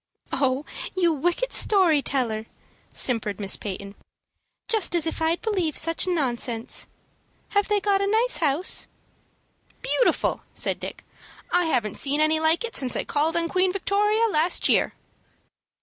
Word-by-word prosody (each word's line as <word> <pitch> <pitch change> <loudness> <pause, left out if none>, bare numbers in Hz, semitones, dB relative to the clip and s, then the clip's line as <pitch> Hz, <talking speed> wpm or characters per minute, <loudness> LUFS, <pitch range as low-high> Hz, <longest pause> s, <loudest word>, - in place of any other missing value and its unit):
"Oh, 270 +1 0 0.3
you 345 -3 +3
wicked 350 - -1
story 360 -8 +4
teller!" 230 -6 -2 0.4
simpered 220 -5 +1
Miss 195 -2 +3
Peyton; 200 0 -6 0.7
"just 430 -6 +2
as 335 - +3
if 325 - -4
I'd 325 +2 0
believe 375 -9 -1
such 330 +2 +2
nonsense. 245 -8 -2 0.6
Have 405 0 +1
they 415 -1 +2
got 395 -1 +1
a 395 - 0
nice 450 +4 +1
house?" 310 +3 +1 1.0
"Beautiful," - - +1
said - - 0
Dick. - - -8 0.5
"I 355 0 +2
haven't 240 -10 -1
seen 285 +1 0
any 310 +1 +3
like 320 +4 +2
it 470 -1 -5
since 260 -2 0
I - - -1
called 315 +3 0
on 335 0 0
Queen 370 +1 +1
Victoria 420 +4 +1
last 320 +2 +2
year." - - +2
330 Hz, 145 wpm, -24 LUFS, 270-395 Hz, 1.0 s, story